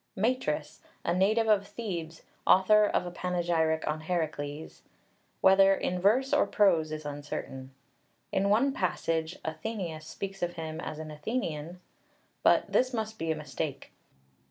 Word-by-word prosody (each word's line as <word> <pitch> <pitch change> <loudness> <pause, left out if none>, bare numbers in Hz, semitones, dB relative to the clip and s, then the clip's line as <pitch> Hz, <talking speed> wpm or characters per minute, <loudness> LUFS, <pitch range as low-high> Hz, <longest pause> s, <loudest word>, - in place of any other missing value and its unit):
MATRIS, 175 - -1 0.2
a - - +2
native 215 +5 +2
of 205 -2 +3
Thebes, 175 -7 -6 0.2
author 210 +3 +6
of - - 0
a 175 - -5
panegyric 170 -3 0
on 155 +1 -1
Herakles, 155 -3 -3 0.6
whether 195 0 +6
in 180 -1 -2
verse 250 +8 +3
or - - +4
prose 170 -7 +3
is 155 -1 -5
uncertain. 145 -2 -6 0.6
In 195 +1 +1
one 245 +7 +3
passage 165 - -1
Athenaeus 160 -1 -4
speaks 195 0 -6
of 175 0 -1
him 160 -1 -5
as 155 - -5
an 155 0 -7
Athenian, 165 -1 -4 0.6
but - - +3
this 255 0 +2
must 220 -1 -4
be 165 0 -1
a - - 0
mistake. 150 -1 -5
175 Hz, 140 wpm, -29 LUFS, 155-200 Hz, 0.6 s, author